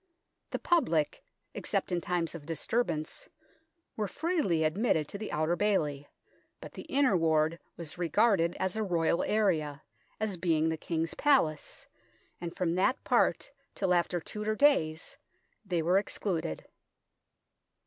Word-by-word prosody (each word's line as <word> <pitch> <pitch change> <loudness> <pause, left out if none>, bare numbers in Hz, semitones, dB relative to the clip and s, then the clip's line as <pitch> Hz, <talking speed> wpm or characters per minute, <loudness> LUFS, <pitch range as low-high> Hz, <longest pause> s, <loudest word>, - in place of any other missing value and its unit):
The - - -2
public, 245 - +1 0.3
except - - -2
in 175 -1 0
tunes 170 -2 -1
of 165 -3 -8
disturbance, 165 - -2 0.7
were 210 -2 -1
freely 290 - 0
admitted 160 -1 +1
to 200 - -6
the 215 - -5
Outer 155 +3 +1
Bailey, 150 -8 0 0.5
but - - -9
the - - -9
Inner 270 -7 +3
Ward 160 -1 +2 0.2
was 170 0 -6
regarded 175 0 +2
as 190 +1 -1
a 220 - -1
Royal 170 -4 +1
area, 160 -9 0 0.4
as 210 -4 -2
being 160 -2 +2
the 160 - 0
King's 165 +1 -2
Palace, 255 - +1 0.6
and 170 -1 -6
from 170 -2 +1
that 195 +9 +1
part - - +2 0.2
till 190 -2 +1
after 175 0 +1
Tudor 210 +5 -3
days 165 - +2 0.5
they 175 -5 -1
were 180 +4 +4
excluded. 175 - -3
175 Hz, 135 wpm, -30 LUFS, 160-210 Hz, 0.7 s, were